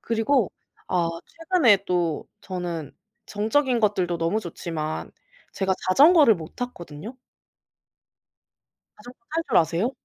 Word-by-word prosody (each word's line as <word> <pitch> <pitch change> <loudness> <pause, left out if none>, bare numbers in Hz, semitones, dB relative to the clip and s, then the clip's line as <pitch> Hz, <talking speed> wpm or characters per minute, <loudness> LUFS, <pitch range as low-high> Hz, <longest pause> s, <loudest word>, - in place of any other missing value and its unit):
그리고 230 0 +1 0.4
어 170 -2 -1
최근에 320 - +2
또 175 -4 -1
저는 175 -5 -5 0.3
정적인 235 +4 +1
것들도 185 -5 +1
너무 165 +7 0
좋지만 160 -4 -5 0.4
제가 190 -1 0
자전거를 290 - +6
못 160 -1 -10
탔거든요? 215 - -7 1.8
자전거 245 +4 -14 0.2
탈 330 - +1
줄 - - +2
아세요? 170 - +2
195 Hz, 240 characters per minute, -24 LUFS, 170-245 Hz, 1.8 s, 자전거를